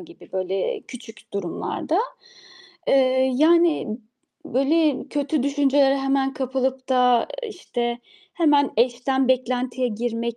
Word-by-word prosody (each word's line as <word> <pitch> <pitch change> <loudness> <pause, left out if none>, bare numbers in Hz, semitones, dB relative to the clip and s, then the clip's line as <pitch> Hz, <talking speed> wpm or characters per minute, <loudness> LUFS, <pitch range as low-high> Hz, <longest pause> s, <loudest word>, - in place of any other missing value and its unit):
gibi 345 0 -15
böyle 190 - -2
küçük 230 - -13
durumlarda, 200 - -2 0.9
eee, 260 -1 +3
yani 315 -6 +3 0.5
böyle 285 +3 +1
kötü 290 -1 -1
düşüncelere 280 0 +3
hemen 270 0 0
kapılıp 265 0 -2
da 250 -2 +3 0.2
işte 240 - -4 0.4
hemen 295 -4 +3
eş'ten 255 +3 +1
beklentiye 255 0 0
girmek 235 +1 -3
260 Hz, 100 wpm, -23 LUFS, 240-285 Hz, 0.9 s, eee